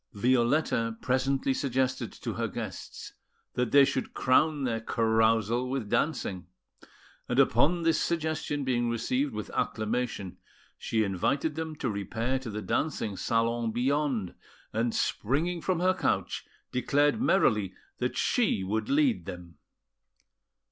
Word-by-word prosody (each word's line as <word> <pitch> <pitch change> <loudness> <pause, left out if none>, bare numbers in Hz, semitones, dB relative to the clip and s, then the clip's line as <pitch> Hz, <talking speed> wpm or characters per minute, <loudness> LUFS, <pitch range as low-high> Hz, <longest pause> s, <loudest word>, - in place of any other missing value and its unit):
Violetta 120 0 +1
presently 135 +1 +1
suggested 130 -1 -1
to - - -5
her - - -1
guests - - -7 0.4
that 125 -1 -1
they 140 -1 +7
should 130 - -3
crown 145 +3 +3
their 115 -3 0
carousal 115 +1 +2
with 130 -6 -3
dancing; 100 - -1 0.8
and - - 0
upon 170 +3 +4
this 165 -1 +2
suggestion 155 -3 -1
being 120 -2 +1
received 125 +4 0
with 105 -3 -6
acclamation, 110 -3 -2 0.4
she 110 -1 0
invited 135 - 0
them 160 0 -4
to 145 - -3
repair 115 +5 -2
to 130 -3 -7
the 105 0 -5
dancing 110 - -1
salon 115 +2 0
beyond, 130 -4 0 0.4
and, 115 +1 0
springing 165 +9 0
from 185 -1 0
her 185 +1 +4
couch, 185 - -1 0.3
declared 145 - +2
merrily 105 - +2 0.2
that - - -1
she 95 - +1
would 105 +4 -2
lead 280 -4 +2
them. 85 -3 -9
125 Hz, 125 wpm, -29 LUFS, 110-145 Hz, 0.8 s, they